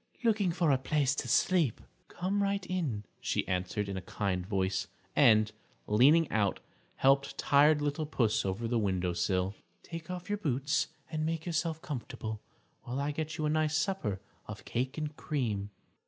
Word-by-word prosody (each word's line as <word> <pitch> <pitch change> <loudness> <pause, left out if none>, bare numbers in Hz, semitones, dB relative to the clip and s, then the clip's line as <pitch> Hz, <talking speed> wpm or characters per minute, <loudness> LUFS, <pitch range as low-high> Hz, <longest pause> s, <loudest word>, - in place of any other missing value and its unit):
"Looking 210 -5 +3
for 165 -3 +2
a 135 - +3
place 140 0 +1
to - - -3
sleep." 170 - +3 0.3
"Come 195 +3 -1
right 200 -1 0
in," 155 - -2 0.2
she - - -1
answered, 90 +2 -1
in 100 -1 -3
a - - -3
kind 95 -2 -2
voice, 95 -1 -1 0.3
and, 110 -6 +5 0.3
leaning 145 +10 +5
out, 100 -3 +1 0.4
helped 135 +1 +3
tired 145 +1 +4
little 145 +1 -1
Puss 115 -7 +1
over 100 +4 -2
the 120 0 +1
windowsill. 95 -1 0 0.3
"Take 165 -1 -8
off 180 0 -5
your 205 0 -1
boots 145 -3 0 0.2
and 155 -1 -1
make 160 0 -2
yourself 165 -1 -1
comfortable, 110 -5 -5 0.4
while 125 +3 -4
I 145 +1 0
get 155 +2 -4
you 155 - -1
a - - +2
nice 155 0 +2
supper 155 - -1 0.3
of 105 0 -8
cake 130 +4 -2
and 155 -1 -3
cream." 110 -9 -2
140 Hz, 165 wpm, -31 LUFS, 105-160 Hz, 0.4 s, and